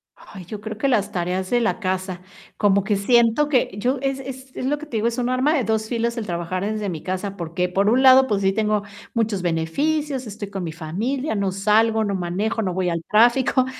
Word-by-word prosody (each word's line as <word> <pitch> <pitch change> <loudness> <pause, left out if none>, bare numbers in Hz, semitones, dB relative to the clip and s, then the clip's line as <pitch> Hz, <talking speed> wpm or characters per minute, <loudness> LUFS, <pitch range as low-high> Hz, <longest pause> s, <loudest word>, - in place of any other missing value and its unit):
Ay, 185 -3 -12
yo 205 +3 -7
creo 215 0 -6
que 275 - 0
las 220 -7 +1
tareas 185 +1 -2
de 245 -1 +2
la 230 0 0
casa. 185 -2 -3 0.4
Como 200 -1 +3
que 205 +1 +1
siento 235 +7 +3
que 255 -8 +2
yo 250 +6 0
es 270 0 -1
es 265 0 -9
es - - -4
lo 295 +3 +1
que 305 - -9
te 245 -7 -4
digo, 220 +2 +1
es 235 +1 -2
un 245 0 0
arma 260 +5 +2
de 265 - +1
2 220 0 -1
filos 235 0 -1
el 225 - -3
trabajar 175 +2 -3
desde 215 -2 -2
mi 160 -4 -5
casa, 190 +1 -4
porque 175 +2 -2
por 195 +3 +2
un 255 +4 +3
lado, 260 0 +7
pues 200 -2 0
sí, 195 - +3
tengo 210 -1 0 0.3
muchos 220 -5 0
beneficios, 260 - -1
estoy 205 -1 -7
con 195 -2 -5
mi 165 - -4
familia, 220 - -3
no 200 -1 0
salgo, 220 +3 +2
no 200 -2 -1
manejo, 190 +6 -1
no 185 -4 -1
voy 185 -1 0
al 170 -1 -2
tráfico. 245 +4 +4
215 Hz, 230 wpm, -22 LUFS, 185-250 Hz, 0.4 s, lado